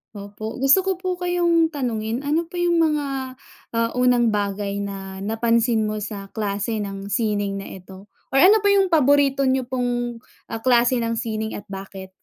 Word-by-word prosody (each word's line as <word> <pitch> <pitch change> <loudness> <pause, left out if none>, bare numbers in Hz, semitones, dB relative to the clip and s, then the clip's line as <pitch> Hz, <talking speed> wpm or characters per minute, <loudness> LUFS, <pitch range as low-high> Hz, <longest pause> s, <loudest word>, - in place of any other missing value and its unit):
Opo. 205 +2 -7
Gusto 275 +8 +6
ko 385 - +1
po 370 -1 -2
kayong 345 -2 +2
tanungin, 235 -2 -2
ano 315 +4 0
po 360 - -12
'yong 345 -1 +2
mga, 300 -3 +1 0.7
ah, 230 0 +1
unang 245 -2 +3
bagay 200 -1 -2
na 195 -1 -6
napansin 225 +2 +1
mo 215 0 -3
sa 200 -1 -6
klase 210 +1 -2
ng 200 0 -5
sining 205 -2 -1
na 195 - -8
ito? 190 +2 -14 0.2
Or 270 - +3
ano 405 +8 +7
po 405 - +4
'yong 395 -1 +4
paborito 280 -2 +3
niyo 260 -1 +1
pong, 245 -2 -2 0.3
ah, 225 0 -6
klase 245 0 +4
ng 230 0 -1
sining 220 -1 -3
at 205 - -16
bakit? 195 -1 -8
230 Hz, 170 wpm, -22 LUFS, 205-275 Hz, 0.7 s, ano